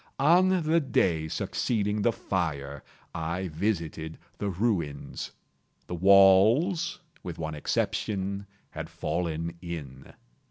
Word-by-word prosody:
On 180 +5 +4
the 160 +2 +3
day 90 - +1
succeeding 105 +5 -1
the 120 - +3
fire, 75 -10 -3 0.3
I 85 +3 -3
visited 80 -2 -2 0.2
the 100 - -1
ruins. 90 -8 -2 0.6
The - - -6
walls, 100 - +5 0.2
with 85 -3 -6
one 80 -1 -4
exception, 100 +6 -2 0.2
had - - -6
fallen 85 0 -3
in. 80 -7 -7
95 Hz, 105 wpm, -28 LUFS, 80-110 Hz, 0.6 s, walls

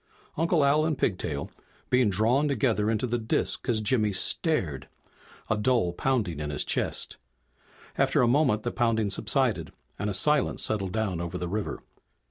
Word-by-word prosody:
Uncle 165 -2 +2
Al 150 +2 +3
and 155 -2 0
Pigtail, 80 - -2 0.4
being 125 -3 +4
drawn 115 +9 +2
together 115 -6 +1
into 115 +3 0
the 120 0 -1
disk 110 +3 -1
as 110 -2 +1
Jimmy 110 -1 +2
stared, 95 - 0 0.6
a 110 - +1
dull 105 -5 +1
pounding 105 - -1
in 75 -1 -3
his 75 0 -2
chest. - - -2 0.8
After - - +3
a - - +4
moment 125 -5 +2
the - - -2
pounding 110 -3 0
subsided - - 0 0.3
and 105 - -1
a 100 - -1
silence 150 +7 +2
settled 100 -4 -1
down 105 -6 -1
over 85 +1 -4
the 90 - -4
river. 105 +3 -4
110 Hz, 160 wpm, -27 LUFS, 95-130 Hz, 0.8 s, being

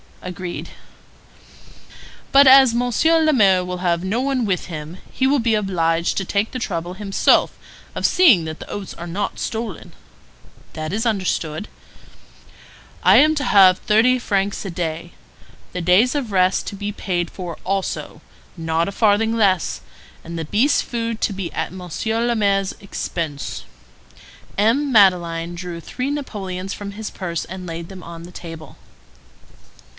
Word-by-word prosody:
"Agreed." 180 0 -6 1.6
"But 280 +1 +7
as 265 -2 +8
Monsieur 245 +7 +2
le 310 -1 +3
Maire 190 -7 +4
will 180 0 -5
have 175 -1 0
no 210 +6 -1
one 265 -3 0
with 185 -3 -1
him, 160 0 -7
he 260 - 0
will 280 +1 +3
be 230 -2 +2
obliged 170 -5 0
to 195 - -1
take 205 +4 -1
the 255 - -4
trouble 175 -5 -3
himself 195 0 +2 0.4
of - - -2
seeing 255 - +5
that 160 0 -6
the - - -10
oats 200 -2 -6
are 170 - -8
not 195 +4 -3
stolen." 220 -5 -5 0.8
"That 155 +2 -5
is 220 +3 -1
understood." 185 -5 -2 1.4
"I - - +7
am 310 +2 +6
to 290 - -1
have 190 -5 +6
thirty 230 +4 +3
francs 200 -3 -1
a - - -3
day. 165 0 -4 0.6
The 180 - -4
days 185 +9 +4
of 260 -7 -2
rest 185 0 +2
to - - -5
be 205 +1 -4
paid 175 -4 -2
for 175 -3 -7
also—not 170 -3 -3
a - - -3
farthing 220 +2 +2
less; 195 -6 +1 0.4
and 170 +1 -7
the 165 - -3
beast's 225 - +2
food 230 -2 -3
to 205 - 0
be 190 -3 -5
at - - -3
Monsieur 220 +6 -2
le 240 0 +1
Maire's 200 -3 +1
expense." 165 -6 -5 0.9
M. 250 +8 +2
Madeleine 175 -5 +3
drew 175 -1 -6
three 255 - -4
napoleons 195 -9 -5
from 200 -1 -7
his 215 +1 -6
purse 170 -4 -4
and 185 +1 -8
laid 165 0 -6
them 190 -2 -10
on 165 0 -9
the 175 - -11
table. 165 -3 -10
195 Hz, 155 wpm, -21 LUFS, 175-225 Hz, 1.6 s, as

